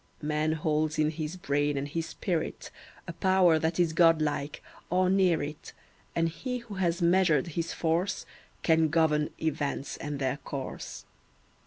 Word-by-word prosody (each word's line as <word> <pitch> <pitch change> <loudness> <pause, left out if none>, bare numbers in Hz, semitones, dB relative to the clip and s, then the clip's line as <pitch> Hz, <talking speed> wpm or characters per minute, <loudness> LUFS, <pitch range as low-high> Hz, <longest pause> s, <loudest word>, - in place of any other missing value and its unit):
Man 150 +1 +1
holds 155 0 0
in 155 0 +2
his 160 +2 -5
brain 145 -3 0
and 140 +1 -2
his 165 +3 -3
spirit 170 -5 -3 0.4
A - - -5
power 185 -4 +4
that 160 +2 -1
is 170 -2 +3
God 165 -1 +5
like, 145 -1 -2 0.3
or 185 +1 +2
near 185 -5 +3
it, 150 +1 -7 0.4
And 165 0 +2
he 250 +10 -4
who 235 -3 -10
has 175 -2 0
measured 170 -4 +3
his 170 +1 -3
force 170 +5 -1 0.4
Can 160 -1 +4
govern 150 -1 +2
events 145 -3 -2
and 145 -1 -4
their 135 0 -1
course. 140 -1 -6
160 Hz, 155 wpm, -29 LUFS, 150-175 Hz, 0.4 s, God